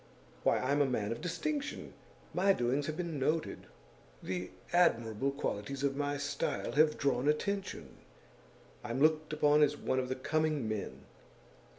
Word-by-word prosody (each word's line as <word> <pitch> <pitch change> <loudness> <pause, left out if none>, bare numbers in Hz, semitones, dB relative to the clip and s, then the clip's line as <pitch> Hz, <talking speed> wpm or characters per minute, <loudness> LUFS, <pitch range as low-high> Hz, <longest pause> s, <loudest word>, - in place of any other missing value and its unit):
Why, - - +3
I'm 140 +3 +1
a 140 - +4
man 110 -5 -1
of 115 - -4
distinction! 290 - -3 0.4
My 195 +2 +4
doings 130 0 0
have 155 0 -3
been 170 -5 -3
noted; 155 +4 -1 0.6
the 90 -1 -3 0.2
admirable 120 -8 +3
qualities 135 -1 -3
of 140 -1 +1
my 145 0 -1
style 145 0 -2
have 155 +1 +4
drawn 140 -1 +1
attention; 195 +6 -2 0.9
I'm 120 +1 -3
looked 155 +1 +3
upon 150 -1 +4
as 150 0 +3
one 130 - 0
of 125 -1 -2
the 130 - -1
coming 155 -1 0
men! 100 -11 -4
145 Hz, 150 wpm, -33 LUFS, 125-155 Hz, 0.9 s, a